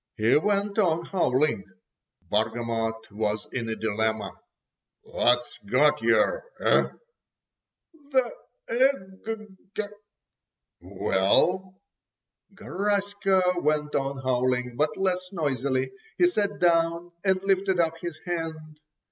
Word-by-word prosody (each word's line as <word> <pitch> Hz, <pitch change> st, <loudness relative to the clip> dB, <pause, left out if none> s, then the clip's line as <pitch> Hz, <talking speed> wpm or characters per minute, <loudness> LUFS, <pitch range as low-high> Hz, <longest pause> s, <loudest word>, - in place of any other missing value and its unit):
He 110 Hz, +2 st, +3 dB
went 200 Hz, +5 st, +1 dB
on 170 Hz, -4 st, +2 dB
howling. 135 Hz, -, +1 dB, 0.7 s
Bargamot 115 Hz, 0 st, -1 dB
was 105 Hz, 0 st, -2 dB
in 120 Hz, -3 st, -3 dB
a 110 Hz, -, -1 dB
dilemma. 110 Hz, 0 st, -1 dB, 0.7 s
"What's 120 Hz, 0 st, +1 dB
got 145 Hz, +8 st, +3 dB
yer, 120 Hz, -, +3 dB, 0.2 s
eh?" -, -, +4 dB, 1.2 s
"The 260 Hz, -4 st, +2 dB, 0.4 s
eg—g." 215 Hz, -4 st, -2 dB, 1.0 s
"Well?" 185 Hz, -, +1 dB, 0.8 s
Garaska 200 Hz, -1 st, 0 dB, 0.2 s
went 150 Hz, 0 st, 0 dB
on 135 Hz, 0 st, -1 dB
howling, 125 Hz, -1 st, 0 dB
but 150 Hz, +4 st, 0 dB
less 185 Hz, -1 st, -1 dB
noisily, 135 Hz, -, -1 dB, 0.3 s
he 355 Hz, -, +5 dB
sat 205 Hz, -, 0 dB
down 170 Hz, 0 st, +2 dB
and 190 Hz, -1 st, +3 dB
lifted 195 Hz, -1 st, +2 dB
up 165 Hz, -1 st, +1 dB
his 170 Hz, -2 st, -5 dB
hand. 160 Hz, -3 st, -5 dB
165 Hz, 95 wpm, -26 LUFS, 125-195 Hz, 1.2 s, he